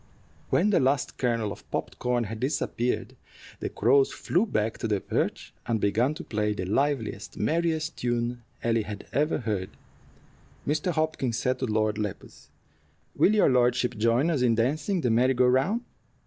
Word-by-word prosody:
When 210 - +3
the - - +4
last 135 0 0
kernel 115 -4 0
of - - -11
popped - - -4
corn 125 -1 +1
had 110 0 -6
disappeared, 125 -2 -1 0.4
the - - -3
crows 135 +5 +3
flew 185 +7 0
back 110 - -1
to - - -2
their 105 -2 +1
perch - - -2
and 115 -2 +1
began 115 +8 +1
to 175 - -7
play 105 -1 -1
the 95 - -4
liveliest, 115 -1 -1
merriest 160 +5 0
tune 120 0 -1 0.2
Ellie 115 -1 +2
had 105 -1 -7
ever 150 +3 +2
heard. 105 -5 -2 1.0
Mr. 155 +5 0
Hopkins 155 -7 -1
said 130 +1 0
to 130 - -1
Lord 110 -1 0
Lepus, 105 -2 -6 0.7
"Will 215 - +4
your 210 - +5
lordship 125 0 +2
join 115 +8 +2
us 145 -6 0
in 120 -2 +3
dancing 155 - 0
the 125 -5 +1
merry 125 +3 +3
go 125 +1 +4
round? 135 - +2
125 Hz, 165 wpm, -27 LUFS, 110-145 Hz, 1.0 s, your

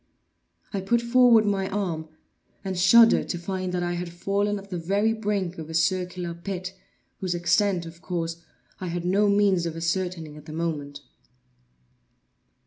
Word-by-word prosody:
I 195 - -1
put 235 +5 +2
forward 235 -2 +5
my 195 -2 0
arm, 175 -6 -3 0.6
and 190 -1 -2
shuddered 225 +6 +6
to 175 - -1
find 185 +1 -3
that 180 -1 -1
I 175 0 -1
had 175 0 -4
fallen 200 +4 -1
at 200 0 -11
the 180 - -2
very 200 +6 +1
brink 200 -5 -2
of 160 -1 -7
a 160 - -5
circular 180 +1 0
pit, 185 +2 -5 0.5
whose 185 -2 -2
extent, 175 +1 +1
of 165 +1 -11
course, 170 -2 -3 0.4
I 185 - -4
had 175 0 -3
no 200 +3 +3
means 200 -4 +3
of 165 - -5
ascertaining 165 -2 -2
at 150 +1 -14
the 155 - -7
moment. 150 -3 -3
180 Hz, 160 wpm, -25 LUFS, 170-200 Hz, 0.6 s, shuddered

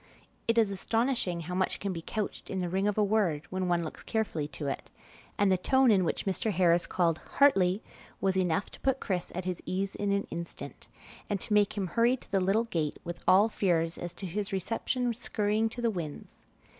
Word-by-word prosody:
It 230 0 +2
is 220 -3 +4
astonishing 225 -3 0
how 175 +2 -5
much 185 +1 0
can 195 -1 -2
be 165 - -5
couched 210 +5 -4
in 190 - -2
the 180 -1 -1
ring 190 +3 +1
of 210 - 0
a 210 - +4
word 195 -8 +1
when 185 -1 -1
one 175 -1 +2
looks 155 - -7
carefully 205 -10 -1
to 145 0 -7
it; 135 - -3 0.5
and 200 -1 +3
the 185 - +3
tone 265 +5 +4
in 190 -3 +4
which 170 - -1
Mr. 200 +3 0
Harris 175 -2 +3
called 170 -3 +1 0.2
"Hartley" 195 -8 +4 0.4
was 190 -1 +1
enough 185 +1 +1
to - - -11
put 270 0 +1
Chris 180 -4 -2
at 185 0 -3
his 180 -2 -3
ease 195 +1 -1
in 205 -1 -1
an 200 0 +1
instant, 170 0 -7 0.4
and 205 -2 0
to 215 - -1
make 210 0 +3
him 195 - 0
hurry 235 +7 +2
to - - -16
the 195 -2 +2
little 195 +5 +3
gate 160 -9 -2
with 175 0 -6
all 190 +4 +7
fears 170 -6 0
as 175 -1 -5
to 195 - -6
his 195 +3 -3
reception 230 +5 -1
skurrying 220 -1 0
to 240 +2 -7
the 230 - +3
winds. 165 -7 -7
195 Hz, 215 wpm, -30 LUFS, 175-215 Hz, 0.5 s, all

